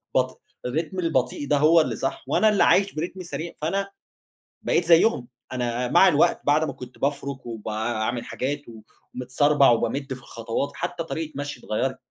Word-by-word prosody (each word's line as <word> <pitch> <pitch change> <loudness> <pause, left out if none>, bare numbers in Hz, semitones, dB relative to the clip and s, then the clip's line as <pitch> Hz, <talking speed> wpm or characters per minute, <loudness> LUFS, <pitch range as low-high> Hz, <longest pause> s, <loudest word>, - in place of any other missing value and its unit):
بط 130 0 0 0.2
الرتم 160 +8 -2
البطيئ 145 -4 0
ده 145 +1 +2
هو 160 +3 +6
اللي - - -2
صح، 135 - -3
وأنا 215 +10 +4
اللي 205 -3 +3
عايش 200 +1 +4
برتم 180 +4 -4
سريع، 170 0 -5
فأنا 195 +5 -1 0.7
بقيت 170 - +1
زيّهم، 165 - +4 0.3
أنا 125 0 -1
مع 190 - +6
الوقت 155 -4 +3
بعد 150 +2 +3
ما - - -4
كنت 125 0 -11
بافرُك 140 -2 -2
وباعمل 110 +1 -3
حاجات 145 +3 -3 0.5
ومتسربَع 140 +3 +3
وبامِدّ 135 +3 -1
في 130 - -9
الخطوات، 120 +3 -4
حتى 175 -1 -3
طريقة 160 -1 -5
مشيي 145 -3 -6
اتغيّرِت، 130 +5 -1
145 Hz, 160 wpm, -24 LUFS, 125-165 Hz, 0.7 s, هو